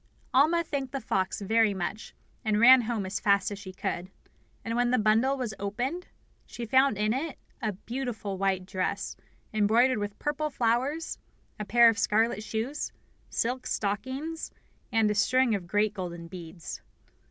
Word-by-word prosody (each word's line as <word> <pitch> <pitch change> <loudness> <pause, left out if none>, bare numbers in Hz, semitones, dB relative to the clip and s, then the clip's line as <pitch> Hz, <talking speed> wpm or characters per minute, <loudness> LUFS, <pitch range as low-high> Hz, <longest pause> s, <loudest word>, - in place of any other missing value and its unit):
Alma 315 +6 +4
thanked 280 -5 -4
the 275 - -1
fox 190 -4 -1
very 220 0 +3
much, 190 +4 -5 0.3
and 215 -1 +1
ran 255 +2 +9
home 225 -3 -2
as 190 +1 -3
fast 200 0 +2
as 200 - -5
she 190 -2 -8
could; 185 -1 -4 0.6
and 230 0 -2
when 245 0 +2
the 255 - +3
bundle 225 +5 +3
was 245 -5 -3
opened 245 - -3 0.4
she 240 - -6
found 260 0 +4
in 215 +1 +1
it 285 +4 -3 0.2
a 215 -2 -1
beautiful 230 -1 -4
white 190 -1 0
dress 190 +1 -2 0.4
embroidered 220 +3 +3
with 205 0 -4
purple 295 +1 -1
flowers, 260 +6 0 0.4
a 210 - -3
pair 235 +2 +6
of 225 -1 +3
scarlet 220 +1 +2
shoes, 225 +7 -3 0.4
silk 250 +2 -1
stockings, 260 +11 -3 0.4
and 220 -2 +3
a - - +2
string 255 +3 +3
of 190 -4 -3
great 205 +2 +1
golden 175 -3 -6
beads. 170 -1 -8
220 Hz, 160 wpm, -28 LUFS, 200-260 Hz, 0.6 s, ran